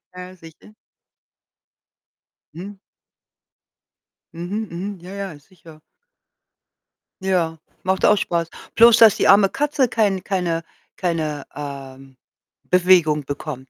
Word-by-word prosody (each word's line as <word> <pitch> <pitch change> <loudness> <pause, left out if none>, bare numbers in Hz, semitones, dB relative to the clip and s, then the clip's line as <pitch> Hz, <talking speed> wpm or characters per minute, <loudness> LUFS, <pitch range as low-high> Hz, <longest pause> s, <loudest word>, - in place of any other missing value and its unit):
Ja, 180 0 -10
sicher. 165 +5 -17 1.8
Mhm. 195 +4 -9 1.6
Mhm. 195 +6 -5
Mhm, 185 +3 -6
ja, 185 +2 -10
ja 195 -7 -7
sicher. 160 -1 -18 1.4
Ja, 175 -4 -1 0.3
macht 190 0 0
auch 210 - +5
spaß. 170 -3 -2 0.3
Bloß, 230 0 +7
dass 225 -3 +7
die - - +1
arme 195 -1 +6
Katze 285 -3 0
kein 200 -5 0
keine 175 -4 -2 0.3
keine, 160 -5 -3
ähm, 135 -2 -9 0.5
Bewegung 175 -5 +3
bekommt. 140 -2 -7
180 Hz, 100 wpm, -21 LUFS, 155-195 Hz, 1.8 s, Bloß